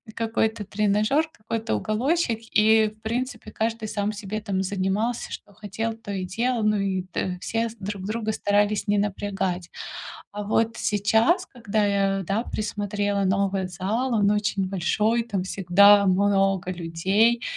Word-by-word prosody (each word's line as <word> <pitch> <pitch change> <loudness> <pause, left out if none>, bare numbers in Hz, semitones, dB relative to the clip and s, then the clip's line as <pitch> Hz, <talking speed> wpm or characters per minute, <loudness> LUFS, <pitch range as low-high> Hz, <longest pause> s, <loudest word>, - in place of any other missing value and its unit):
какой-то 225 -1 0
тренажёр, 210 +9 +1
какой-то 225 +1 -3
уголочек, 240 +3 0 0.2
и, 220 0 +5
в - - -32
принципе, 230 0 -3
каждый 225 0 -2
сам 205 0 -1
себе 210 +1 -5
там 195 -3 -1
занимался, 200 +5 -1
что 205 - -9
хотел, 215 +2 -4
то 225 -2 -9
и 190 -1 -2
делал, 230 +5 -1
ну, 210 0 +3
и 195 -2 0
та 180 +1 -2
все 230 0 -1
друг 195 0 -5
друга 220 +1 -2
старались 205 0 +1
не 205 0 +2
напрягать. 195 -3 -2 0.6
А 210 +1 -4
вот 225 +2 +1
сейчас, 220 - +2
когда 220 -4 -1
я, 195 -1 +1
да, 200 +5 0
присмотрела 205 -2 -2
новый 195 0 +1
зал, 210 +8 -1
он 205 -2 +3
очень 205 -2 0
большой, 210 +5 +1
там 205 -5 -2
всегда 200 +2 +5
много 195 -1 +2
людей 190 +7 +1
205 Hz, 145 wpm, -25 LUFS, 195-225 Hz, 0.6 s, и